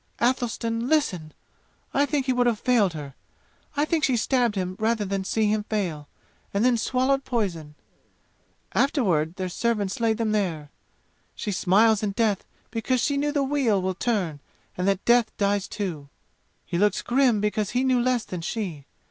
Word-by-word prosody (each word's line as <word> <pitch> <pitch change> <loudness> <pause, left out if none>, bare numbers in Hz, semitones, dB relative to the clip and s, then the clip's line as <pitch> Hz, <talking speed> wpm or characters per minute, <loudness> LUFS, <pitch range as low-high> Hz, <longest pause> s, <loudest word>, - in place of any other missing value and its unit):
Athelstan 235 -1 0
listen! 185 - 0 0.6
I 285 +1 +3
think 285 -3 0
he 260 - +1
would 245 -1 +2
have 235 -3 +2
failed 220 -8 +2
her! 145 -3 -7 0.6
I 295 - +3
think 315 0 0
she 255 -3 +3
stabbed 240 -2 +1
him 185 -1 -2
rather 220 -1 +1
than 195 0 -2
see 220 +3 0
him 215 -1 0
fail, 175 -10 -3 0.4
and 200 +4 +1
then 250 -1 +4
swallowed 260 +4 +1
poison! 175 - -3 1.0
Afterward 180 - +1
their 185 -1 -3
servants 205 +1 -1
laid 225 -2 +1
them 225 -2 0
there. 165 -9 -1 0.6
She 210 - -3
smiles 205 +3 +3
in 205 -2 -1
death 210 -3 +1 0.3
because 235 +3 0
she 285 +4 +1
knew 290 +1 0
the 290 -2 +1
wheel 265 -7 +1
will 185 0 -1
turn 185 -8 -1 0.4
and 180 +1 -1
that 195 -1 0
death 235 -2 +3
dies 200 -1 +1
too! 165 -9 -5 0.6
He 170 - -2
looks 205 +1 +2
grim 245 -3 +3
because 210 0 0
he 250 +1 0
knew 255 -2 +3
less 250 -2 +1
than 180 -2 -5
she. 165 -7 -4
215 Hz, 170 wpm, -25 LUFS, 190-245 Hz, 1.0 s, then